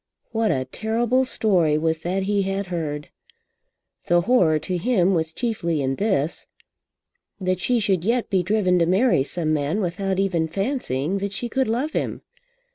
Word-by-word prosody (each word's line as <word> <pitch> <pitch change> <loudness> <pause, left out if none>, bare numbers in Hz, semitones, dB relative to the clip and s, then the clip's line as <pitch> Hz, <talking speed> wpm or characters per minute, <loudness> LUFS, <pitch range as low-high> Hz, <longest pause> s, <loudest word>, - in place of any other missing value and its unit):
What 225 -1 +1
a 130 -1 0
terrible 230 - 0
story 180 -11 +2
was 160 0 0
that 185 +4 -2
he 200 +1 +1
had 195 +1 -2
heard! 150 -3 -3 1.0
The 175 0 +4
horror 175 -7 +3
to 180 +3 -3
him 195 -3 +2
was 160 -2 0
chiefly 170 -7 -2
in 135 0 -1
this, 165 -7 -1 0.9
that 185 -1 -1
she 240 +7 +1
should 195 -5 +1
yet 235 +4 +1
be 190 -4 +1
driven 185 -1 +2
to 170 - +2
marry 195 - +3
some 155 +3 -1
man 150 +6 0
without 190 0 -1
even 180 -4 +1
fancying 195 - -2
that 200 0 -3
she 240 +4 -3
could 265 +2 0
love 250 +8 -1
him! - - -3
190 Hz, 165 wpm, -23 LUFS, 165-220 Hz, 1.0 s, The